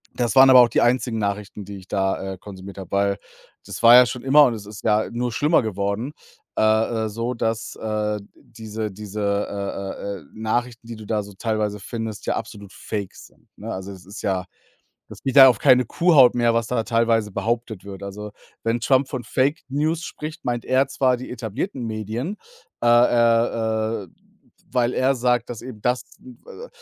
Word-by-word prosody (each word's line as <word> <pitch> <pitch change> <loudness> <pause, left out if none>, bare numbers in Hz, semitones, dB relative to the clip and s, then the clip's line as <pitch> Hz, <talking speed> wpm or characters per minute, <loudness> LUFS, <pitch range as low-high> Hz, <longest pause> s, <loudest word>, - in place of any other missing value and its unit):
Das 120 0 -1
waren 135 0 +8
aber 130 -1 +9
auch 120 - +4
die - - +1
einzigen 120 -1 +1
Nachrichten, 100 -1 -3
die 100 0 -8
ich 95 - -14
da, 95 0 -1
äh, - - -10
konsumiert 95 0 -11
habe, 95 -2 -9
weil 100 0 +1 0.5
das - - -7
war 115 +1 +9
ja 125 0 +9
schon 125 0 -5
immer 145 +2 +6
und 125 - +1
es 105 -2 -8
ist 105 +1 -10
ja 110 0 +2
nur 120 0 -2
schlimmer 150 +8 +3
geworden, 105 +5 -3 0.4
äh, - - +2 0.4
äh, - - -3
so 115 +4 -3
dass, 115 -1 -3
äh, 105 -1 -2 0.2
diese 110 -2 -7
diese, 105 +1 -7
äh, 100 -1 -3
äh, - - -11
äh, - - -17
Nachrichten, 115 +2 -2
die 115 - -7
du 110 - -11
da 105 -2 -1
so 100 0 -12
teilweise 105 -1 -2
findest, 110 +1 -6
ja - - +1
absolut 100 -2 -7
Fake 100 -3 -5
sind, - - -17
ne? - - -6
Also, 95 +1 -6
es 95 -2 -12
ist 100 +4 -9
ja 95 -2 -1 0.7
es - - -12
geht 135 0 -2
da 135 -1 +11
auf 120 -4 +2
keine 125 -1 +4
Kuhhaut 150 -4 +5
mehr, 120 -1 +2
was 115 -1 0
da 115 -1 -1
teilweise 115 -2 +1
behauptet 110 0 -3
wird. 100 -1 -9
Also, 105 +1 -7 0.3
wenn 115 +1 0
Trump 130 +2 +2
von 130 -3 -5
„Fake-News“ 145 +5 -1
spricht, 155 -1 -8
meint 120 -1 -2
er 130 +2 +3
zwar 130 -2 +1
die 125 - -9
etablierten 125 - -4
Medien, 110 - -4 0.5
äh, - - +3
äh, 115 -2 +2
äh, 90 - -17 0.6
weil 125 -1 +1
er 135 +2 +2
sagt, 125 -1 0
dass 120 -3 -7
eben 120 -4 -9
das 125 +3 0 0.2
n 255 -1 -14
w 485 - -14 0.2
äh, - - -19
115 Hz, 195 wpm, -22 LUFS, 105-125 Hz, 0.7 s, da